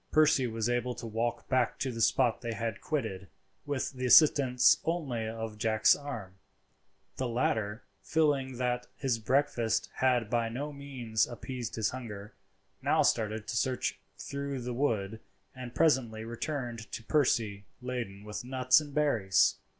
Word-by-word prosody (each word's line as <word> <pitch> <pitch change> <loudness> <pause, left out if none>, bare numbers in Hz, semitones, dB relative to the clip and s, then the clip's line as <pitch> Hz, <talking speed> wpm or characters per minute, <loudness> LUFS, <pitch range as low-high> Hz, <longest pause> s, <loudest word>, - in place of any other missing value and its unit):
Percy 155 -4 +4
was 110 -1 -2
able 120 0 -1
to - - -8
walk 115 +1 -2
back 130 -3 +1
to 130 - -2
the 115 -1 -4
spot 120 +2 +3
they 120 -2 -3
had 115 -2 -4
quitted, 110 -11 -3 0.4
with 145 -2 -1
the 130 -2 -3
assistance 130 -3 +6
only 140 -10 -2
of 110 -1 -5
Jack's 110 -1 +4
arm. 110 -10 -7 0.8
The 130 - -1
latter, 110 -3 -1 0.2
feeling 140 -5 +1
that 125 0 -1
his 130 -5 -1
breakfast 120 -1 +1
had 125 -4 +2
by 115 0 0
no 145 +6 -4
means 130 -6 -1
appeased 120 0 -6
his 110 -2 0
hunger, 105 -5 -7 0.5
now - - +3
started 110 0 +1
for - - -4
a - - -3
search 130 +2 -1 0.2
through 140 -1 -4
the 125 0 -4
wood, 110 -5 -1 0.4
and 125 -2 -8
presently 120 -8 +2
returned 120 -2 -5
to 115 - -5
Percy 110 -8 +1
laden 120 -6 -5
with 105 +2 -6
nuts 130 +2 +3
and 145 -1 -10
berries. 115 -11 +3
120 Hz, 150 wpm, -30 LUFS, 110-130 Hz, 0.8 s, assistance